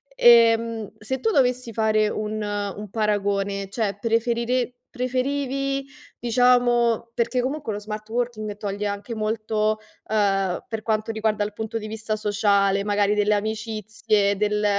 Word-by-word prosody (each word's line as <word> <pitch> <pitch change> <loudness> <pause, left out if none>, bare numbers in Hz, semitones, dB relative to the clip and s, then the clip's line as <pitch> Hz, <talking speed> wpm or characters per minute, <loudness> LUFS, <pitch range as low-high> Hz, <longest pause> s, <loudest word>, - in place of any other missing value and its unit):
Ehm, 230 -2 +5
se 260 +5 -4
tu 450 - +1
dovessi 250 - +1
fare 215 -1 +2
un 215 0 -3
un 205 0 -4
paragone, 200 -2 -1
cioè 200 -2 -2
preferire 235 +2 0 0.2
preferivi 275 +2 -1 0.3
diciamo 240 -1 +3
perché 245 +2 0
comunque 270 -3 -3
lo 205 - -4
smart 215 +1 -6
working 225 -3 -3
toglie 205 0 -3
anche 205 +3 -4
molto, 215 0 0 0.3
uhm, 195 -3 +1
per 220 -1 -4
quanto 220 0 0
riguarda 220 -1 0
il 210 - -3
punto 220 +2 -4
di 215 -1 -5
vista 220 0 -3
sociale, 200 -1 +2
magari 205 0 +2
delle 210 0 +2
amicizie, 215 -1 0
del 210 0 +1
215 Hz, 135 wpm, -24 LUFS, 205-235 Hz, 0.3 s, Ehm